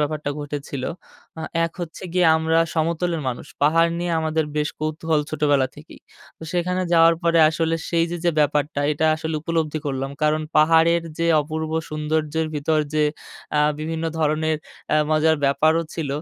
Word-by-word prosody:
ব্যাপারটা 150 -1 -1
ঘটেছিল। 145 -2 -5 0.6
আ - - -5 0.2
এক 165 - -3
হচ্ছে 165 0 -7
গিয়ে 180 -2 +3
আমরা 160 +1 +1 0.2
সমতলের 165 +1 0
মানুষ। 120 - -5 0.2
পাহাড় 165 +3 +4
নিয়ে 175 -1 -2
আমাদের 160 0 0
বেশ 150 -1 +1
কৌতূহল 155 0 0
ছোটবেলা 145 -3 +2
থেকেই। 150 +2 -14 0.4
তো - - -13
সেখানে 180 +1 0
যাওয়ার 165 0 +6
পরে 170 0 +3
আসলে 165 +1 0
সেই 165 -1 +2
যে, 175 - -3
যে, 175 - +4
ব্যাপারটা 145 0 +1
এটা 160 +2 0
আসলে 160 0 -4
উপলব্ধি 160 -2 -1
করলাম। 135 -1 -2
কারণ 155 +1 +2
পাহাড়ের 165 +2 +4 0.2
যে, 165 - 0 0.2
অপূর্ব 155 +1 -4 0.2
সৌন্দর্যের 155 +1 -1
ভিতর 155 +2 +1 0.2
যে 150 0 +3 0.5
আ - - +4 0.2
বিভিন্ন 160 +1 -3
ধরনের 155 0 +1 0.4
আ - - +5
মজার 155 +1 +3
ব্যাপারও 155 +4 +3
ছিল 160 -4 -3
155 Hz, 160 wpm, -22 LUFS, 150-165 Hz, 0.6 s, যাওয়ার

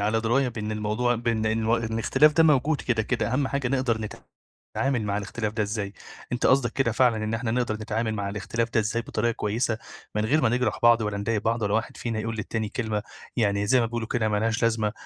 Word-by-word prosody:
على 110 +2 +1
دراية 125 +4 +2
بإن 110 -2 -4
الموضوع 110 +3 0
بإن 115 -1 -1
إن 110 +1 +1
الاختلاف 115 +6 +3
ده 165 - +4
موجود 150 -1 +3
كده، 115 -3 0
كده. 115 - -1
أهم 135 0 +1
حاجة 140 -3 -1
نقدَر 115 -5 0 0.7
نتعامل 135 -3 +1
مع 100 0 -1
الاختلاف 105 +1 -3
ده 110 - 0
إزاي. 105 -1 -3 0.4
أنت 120 - -1
قصدك 130 -2 +4
كده 135 - +1
فعلًا، 120 -4 +3
إن 110 +1 -2
إحنا 115 0 -1
نقدَر 120 -2 0
نتعامل 110 +1 -2
مع 100 -2 -2
الاختلاف 110 +3 -2
ده 115 - +2
إزاي 110 +2 0
بطريقة 115 +1 -1
كويّسة، 110 +1 -1 0.4
من 105 - +1
غير 150 +7 +2
ما - - +3
نجرَح 125 +1 0
بعض، 120 -1 +6
ولا 105 -1 -2
نضايق 105 0 -1
بعض، 115 +1 0
ولا 105 0 0
واحد 115 0 -1
فينا 115 -2 -3
يقول 115 +1 -3
للتاني 110 0 -3
كلمة، 110 -2 -2 0.3
يعني 100 -3 +1
زي 130 +3 +5
ما 115 - +2
بيقولوا 115 -1 -3
كده، 110 -3 0
مالهاش 110 +3 0
لازمة، 110 -2 +1
115 Hz, 215 wpm, -26 LUFS, 110-120 Hz, 0.7 s, بعض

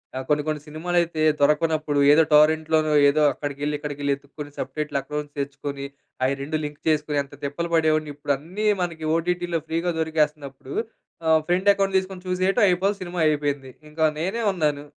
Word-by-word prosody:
ఆహ్, 130 0 -4
కొన్ని 150 0 +2
కొన్ని 155 -1 -2
సినిమాలైతే 165 +1 -1 0.2
దొరకనప్పుడు 150 0 +2
ఏదో 155 +2 +6
టోరెంట్‌లోనో 155 0 +4 0.2
ఏదో 155 +2 +1
అక్కడికెళ్ళి 145 +2 -3
ఇక్కడికి 145 -1 -6
వెళ్లి 140 -1 +1
వెతుక్కొని 145 +1 -10
సబ్‌టైటిల్ 150 -2 -2
అకౌంట్స్ 150 0 -6
తెచ్చుకొని 140 0 -4 0.4
అయి 135 +1 +1
2 155 +2 -2
లింక్ 150 0 -8
చేసుకొని 150 -1 +1
ఎంత 140 - -18
తిప్పలు 170 +4 -3
పడేవాడిని 155 -2 +2
ఇప్పుడన్నీ 155 +9 -2 0.2
మనకి 165 -2 -4
ఓటిటి‌లో 175 0 -1
ఫ్రీ‌గా 165 +2 -1
దొరికేస్తున్నప్పుడు 150 -4 -2 0.5
ఆహ్, 160 0 +5
ఫ్రెండ్ 185 +3 +4
అకౌంట్ 195 -1 0
తీసుకొని 185 -1 -9
చూసేయటం 185 +5 +1
అయిపోవాలి. 190 +3 +1
సినిమా 180 -1 -5
అయిపోయింది. 145 -3 -1 0.2
ఇంకా 160 +1 +1
నేనే 195 +8 -2
ఉన్నాను. 150 -4 -1
155 Hz, 150 wpm, -24 LUFS, 145-170 Hz, 0.5 s, ఏదో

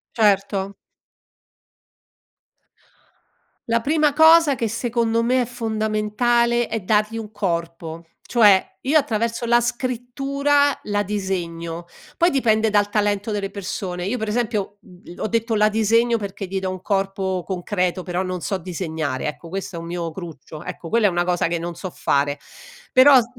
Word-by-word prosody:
Certo. 200 -2 +1 2.9
La 230 0 +2
prima 300 +1 +2
cosa 320 -1 +6
che, 230 -3 -1
secondo 230 0 0
me, 250 +2 +2
è - - 0
fondamentale, 230 +1 0
è 225 -2 -3
dargli 215 +3 +1
un 215 -1 -6
corpo. 170 -4 -3 0.2
Cioè, 210 -5 +5 0.2
io 290 +4 +3
attraverso 230 -2 -1
la 240 0 +5
scrittura, 275 +4 0
la 205 0 0
disegno. 175 -4 -3 0.3
Poi, 345 +1 +3
dipende 225 -6 +2
dal 205 -1 +2
talento 205 0 0
delle 200 -1 -2
persone. 185 -2 -4
Io 245 +5 -2
per 220 - -3
esempio, 210 -2 -2
mhmm, 180 -2 -14
l - - -16
ho - - -1
detto 230 0 0
la 210 0 +4
disegno 230 +2 +2
perché 200 -1 -5
gli 190 +1 -3
do 190 0 -3
un 185 -1 -6
corpo 195 -2 -1
concreto, 180 -1 -2
però 180 0 -2
non 185 -1 -3
so 195 -3 -2
disegnare, 160 -6 -3
ecco, 165 +2 -7
questo 195 -1 -5
è - - -4
un 165 - -7
mio 170 -1 -3
cruccio, 160 -3 -9
ecco, 165 - -7
quella 225 0 +3
è - - +3
una 175 0 0
cosa 175 -1 +1
che 170 0 -1
non 170 +1 -4
so 185 +3 -6
fare. 145 -3 0 0.6
Però 260 +1 +8
s 230 - -1
210 Hz, 160 wpm, -22 LUFS, 180-235 Hz, 2.9 s, Però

